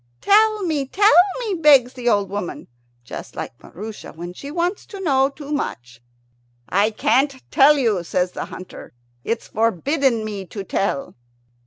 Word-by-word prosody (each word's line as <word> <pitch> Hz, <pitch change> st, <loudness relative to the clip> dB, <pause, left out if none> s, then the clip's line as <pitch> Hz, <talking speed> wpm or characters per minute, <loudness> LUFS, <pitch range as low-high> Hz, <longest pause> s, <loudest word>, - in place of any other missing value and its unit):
"Tell 430 Hz, 0 st, +4 dB
me, 300 Hz, -6 st, -1 dB
tell 410 Hz, +9 st, +4 dB, 0.3 s
me," 440 Hz, -5 st, -2 dB
begs 275 Hz, -5 st, +6 dB
the 245 Hz, -2 st, -1 dB
old 205 Hz, -3 st, +2 dB
woman, 200 Hz, -3 st, -5 dB, 0.4 s
just -, -, -9 dB
like -, -, -7 dB
Maroosia 210 Hz, +4 st, -9 dB
when 175 Hz, +2 st, -8 dB
she 280 Hz, +9 st, -9 dB
wants 345 Hz, +5 st, -2 dB
to 400 Hz, -, -9 dB
know 270 Hz, -7 st, +2 dB
too 285 Hz, +1 st, -10 dB
much. 120 Hz, -, -4 dB, 0.7 s
"I 200 Hz, +4 st, +2 dB
can't 260 Hz, +5 st, +1 dB
tell 290 Hz, +2 st, +6 dB
you," 220 Hz, -9 st, +1 dB
says 180 Hz, +1 st, -1 dB
the -, -, -5 dB
hunter; 185 Hz, -, -11 dB, 0.3 s
"it's 230 Hz, 0 st, -3 dB
forbidden 230 Hz, -, +1 dB
me 200 Hz, -3 st, -6 dB
to 200 Hz, +3 st, -6 dB
tell." 195 Hz, -7 st, -2 dB
245 Hz, 155 wpm, -21 LUFS, 200-295 Hz, 0.7 s, begs